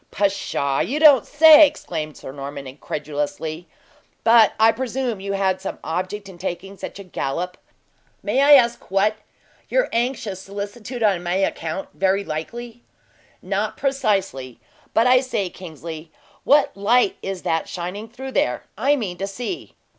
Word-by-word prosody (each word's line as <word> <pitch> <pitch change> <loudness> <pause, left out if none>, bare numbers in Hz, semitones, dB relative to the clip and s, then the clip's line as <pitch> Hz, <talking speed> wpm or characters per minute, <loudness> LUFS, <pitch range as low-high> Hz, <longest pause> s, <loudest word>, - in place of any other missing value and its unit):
"Pshaw! 190 -8 0
You 290 +4 -1
don't 290 -7 +7
say 310 +1 +8
so?" - - +9
exclaimed 160 - -6
Sir - - -8
Norman, 140 0 -7
incredulously. 150 +4 -5 0.6
"But 225 -2 +6
I 220 +1 +6
presume 250 -2 -3
you 200 +1 -4
had 190 -1 0
some 195 - -5
object 185 +5 -3
in 185 -3 -12
taking 190 +2 -5
such - - -8
a 200 - -8
gallop? 180 0 -3 0.7
May 270 - +1
I 290 +1 +7
ask 240 -4 +4
what? 200 +3 +2 0.5
Your - - +2
anxious 230 -5 -1
solicitude 205 +5 -6
on 195 -5 +3
my 175 +1 -2
account, 190 -2 -2
very 195 +1 +1
likely?" 235 +10 -6 0.6
"Not - - -2
precisely. 195 - -1 0.4
But, 225 - +4
I 255 0 +6
say, 205 -8 -2
Kingsley, 160 -2 -9 0.3
what 290 0 +4
light 245 - +2
is 195 -2 -5
that 165 0 -1
shining 185 +5 -5
through 265 +3 -8
there? 125 - 0
I 275 +6 +2
mean 195 -10 -4
to 195 - -2
see." 245 - -6
195 Hz, 150 wpm, -22 LUFS, 175-240 Hz, 0.7 s, so